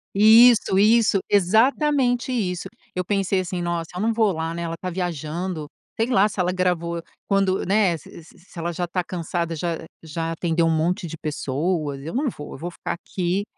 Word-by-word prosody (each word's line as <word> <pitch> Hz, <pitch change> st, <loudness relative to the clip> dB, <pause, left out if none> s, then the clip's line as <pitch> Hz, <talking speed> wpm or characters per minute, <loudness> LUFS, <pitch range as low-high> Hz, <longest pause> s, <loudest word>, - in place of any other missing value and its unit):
Isso, 220 Hz, -1 st, +6 dB
isso, 215 Hz, -1 st, +4 dB
exatamente 245 Hz, -, +3 dB
isso. 185 Hz, -7 st, -2 dB, 0.3 s
Eu 180 Hz, -, -1 dB
pensei 195 Hz, 0 st, +1 dB
assim: 180 Hz, -1 st, -3 dB
"Nossa, 170 Hz, -1 st, -2 dB
eu -, -, -3 dB
não 225 Hz, +2 st, +2 dB
vou 220 Hz, -2 st, +3 dB
lá, 160 Hz, 0 st, -3 dB
né? 170 Hz, 0 st, -4 dB
Ela 165 Hz, -1 st, -3 dB
está 185 Hz, +2 st, -5 dB
viajando, 170 Hz, -1 st, -3 dB, 0.3 s
sei 225 Hz, -, +2 dB
lá, 210 Hz, -4 st, +4 dB
se 205 Hz, -, -10 dB
ela 180 Hz, 0 st, +1 dB
gravou 170 Hz, -2 st, -1 dB, 0.2 s
quando, 195 Hz, -1 st, +1 dB
né, 195 Hz, -3 st, +2 dB
se 165 Hz, -, -13 dB
se 175 Hz, +2 st, -17 dB
ela 170 Hz, +1 st, -2 dB
já 175 Hz, +2 st, -2 dB
está 180 Hz, +1 st, -2 dB
cansada, 170 Hz, -1 st, -3 dB
já 170 Hz, +1 st, -2 dB, 0.2 s
já 165 Hz, +1 st, -4 dB
atendeu 165 Hz, 0 st, 0 dB
um -, -, +3 dB
monte 170 Hz, +2 st, 0 dB
de 165 Hz, -, -7 dB
pessoas. 150 Hz, 0 st, -2 dB
Eu 165 Hz, -, -6 dB
não 275 Hz, +3 st, +1 dB
vou; 150 Hz, -10 st, -7 dB
eu -, -, -8 dB
vou 175 Hz, +5 st, -5 dB
ficar -, -, -5 dB
aqui 180 Hz, +2 st, -2 dB
180 Hz, 190 wpm, -23 LUFS, 165-200 Hz, 0.3 s, Isso